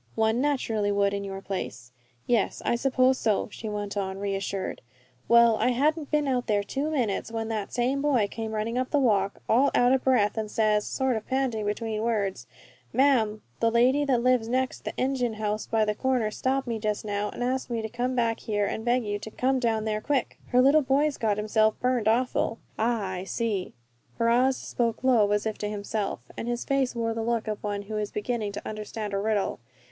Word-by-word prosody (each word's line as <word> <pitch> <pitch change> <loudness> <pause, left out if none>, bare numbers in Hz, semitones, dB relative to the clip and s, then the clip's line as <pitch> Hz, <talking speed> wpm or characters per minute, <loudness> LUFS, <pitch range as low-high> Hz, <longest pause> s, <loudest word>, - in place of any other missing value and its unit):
"One 220 +2 +2
naturally 225 -8 0
would 200 0 +2
in 200 0 -2
your 195 -1 -6
place." 120 - -5 0.3
"Yes, 235 -5 +1
I - - +2
suppose 255 +1 +2
so," 215 -2 +1
she 220 - -6
went 205 -1 -4
on, 190 -1 -2
reassured. 195 -1 -3 0.5
"Well, 235 -1 +6
I - - +1
hadn't 295 +4 +1
been 300 -1 +1
out 250 -2 0
there 205 -2 +2
two 275 +8 -2
minutes 235 -8 -1
when 225 -1 -3
that 215 -3 -3
same 255 +3 0
boy 265 -8 +2
came 220 +1 -5
running 230 +3 -1
up 255 - -1
the 295 - +1
walk, 205 -7 +1
all 260 +5 +4
out 245 0 +4
of 265 - +1
breath, 225 -5 +2
and 215 -1 -3
says, 210 -1 +1
sort 265 -2 0
of 220 - -7
panting 260 -5 0
between 215 +1 -2
words, 200 - -1 0.4
'Ma'am, 230 -6 +2 0.2
the 230 - +3
lady 250 +5 +3
that 250 -4 +1
lives 250 -3 +3
next 255 +1 -1
the - - -5
engine 255 -3 0
house 215 0 -2
by 220 -1 +2
the 210 - 0
corner 245 -2 0
stopped 265 +4 -1
me 230 -2 -3
just 210 0 -2
now 205 0 -1
an' - - -5
asked 260 +1 -1
me 230 -2 -2
to - - -2
come 245 +3 -2
back 230 -2 +1
here 205 -2 -1
an' 220 - -3
beg 245 0 +1
you 205 0 -2
to 220 - -7
come 260 +4 0
down 225 -3 0
there 215 -1 -1
quick! 275 -2 -1
Her 250 0 +4
little 290 +3 +6
boy's 280 +2 +1
got 210 -2 +1
himself 215 +1 +2
burned 250 -3 +1
awful!'" 230 0 +1 0.2
"Ah! 220 -4 0
I 185 -1 -4
see!" 200 - -2 0.4
Ferrars 245 +3 +3
spoke 230 0 -2
low, 235 -6 +4
as 210 +1 +1
if 220 -1 -3
to 210 - -2
himself, 205 0 -3
and 230 - -5
his 240 0 -2
face 275 -3 0
wore 230 -1 -1
the 225 - -3
look 230 -1 -1
of 215 -1 -4
one 205 -1 -2
who 215 +1 -5
is 210 -1 -2
beginning 210 -1 -2
to 205 - -6
understand 215 -1 -5
a 195 - 0
riddle. 210 -5 0
225 Hz, 210 wpm, -27 LUFS, 210-255 Hz, 0.5 s, Well